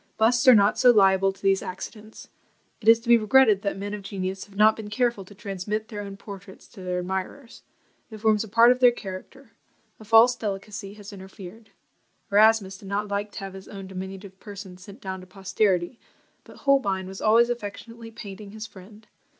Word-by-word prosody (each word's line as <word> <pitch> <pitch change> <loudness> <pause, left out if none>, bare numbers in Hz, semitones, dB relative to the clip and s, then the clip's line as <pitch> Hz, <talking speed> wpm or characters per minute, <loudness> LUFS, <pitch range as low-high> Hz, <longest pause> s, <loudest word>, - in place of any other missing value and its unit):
Busts 235 +3 +2
are 255 - +10
not 205 0 +3
so 250 - +6
liable 195 -3 +4
to 195 0 -19
these 195 -1 +2
accidents. 210 +4 -9 0.5
It 215 - -9
is 225 0 +7
to 235 - -15
be 235 -1 +6
regretted 215 -2 +4
that 200 -1 -3
men 205 +1 -5
of 210 - -5
genius 190 -1 -5
have 200 - -20
not 215 +1 +5
been 215 -2 -8
careful 235 -2 0
to 205 - -15
transmit 210 +2 -5
their 210 -3 -6
own 200 -1 -8
portraits 195 -2 -12
to 200 - -13
their 180 -1 -3
admirers: 190 +8 -5 0.5
it 220 - -9
forms 215 0 +2
a - - -9
part 230 +4 +6
of 250 - 0
their 250 -1 +7
character; 235 +5 -9 0.5
a - - -12
false 225 +3 +5
delicacy 200 -2 -6
has 205 0 -11
interfered. 195 +3 -12 0.6
Erasmus 205 -2 +4
did 195 - -12
not 205 +1 -2
like 205 +1 -3
to - - -6
have 195 -1 -7
his 190 0 -11
own 195 -1 -9
diminutive 190 +1 -8
person 200 -3 -10
sent 195 +6 -14
down 190 -1 -6
to 185 - -14
posterity, 190 +1 -1 0.5
but - - -15
Holbein 200 -10 +2
was 190 +1 -9
always 230 +3 +4
affectionately 230 +1 -7
painting 205 -2 -10
his 215 +1 -8
friend. 210 +2 -15
205 Hz, 195 wpm, -25 LUFS, 195-225 Hz, 0.6 s, are